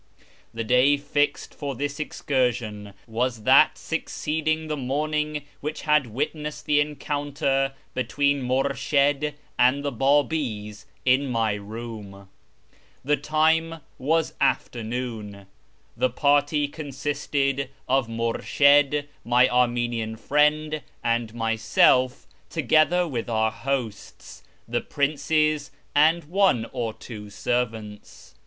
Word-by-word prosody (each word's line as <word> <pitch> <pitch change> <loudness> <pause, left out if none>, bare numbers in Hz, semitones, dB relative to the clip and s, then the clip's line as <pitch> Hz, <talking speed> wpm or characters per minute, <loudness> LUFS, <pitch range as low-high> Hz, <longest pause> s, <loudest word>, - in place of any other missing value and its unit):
The 115 0 -4
day 125 +5 +4
fixed 145 +1 -1
for 140 -2 -5
this 145 +3 -4
excursion 120 -9 -2
was 120 0 -2
that - - +5
succeeding 155 +1 -2
the 155 - -2
morning 150 +2 -2 0.2
which 150 +2 -5
had 150 -4 +3
witnessed 150 +6 -4
the 150 -1 +3
encounter 145 -2 -1 0.2
between 140 +2 0
INIurshid 140 +2 +1 0.2
and 130 +4 +3
the 145 - 0
Babis, 125 -6 0 0.2
in 130 +2 +3
my 115 -4 0
room. 105 -2 -8 0.8
The 150 +2 +3
time 160 +3 +1 0.2
was 160 +4 +1
afternoon. 110 -4 -2 0.5
The 130 - +1
party 145 +3 +2
consisted 140 -2 -2 0.2
of 130 -2 +2
IMurshid, 140 +5 +3 0.2
my 125 +2 +4
Armenian 120 -2 0
friend, 150 +5 +1 0.2
and 115 -1 0
myself, 115 - +2 0.2
together 175 +3 +3
with 120 -6 -4
our 110 -1 +1
hosts, 125 -5 -5 0.3
the 120 +1 -1
princes, 150 +1 0 0.2
and 160 +4 +4
one 175 - +2
or 120 -3 -2
two 105 -2 -10
servants. 110 - -4
135 Hz, 105 wpm, -25 LUFS, 115-150 Hz, 0.8 s, that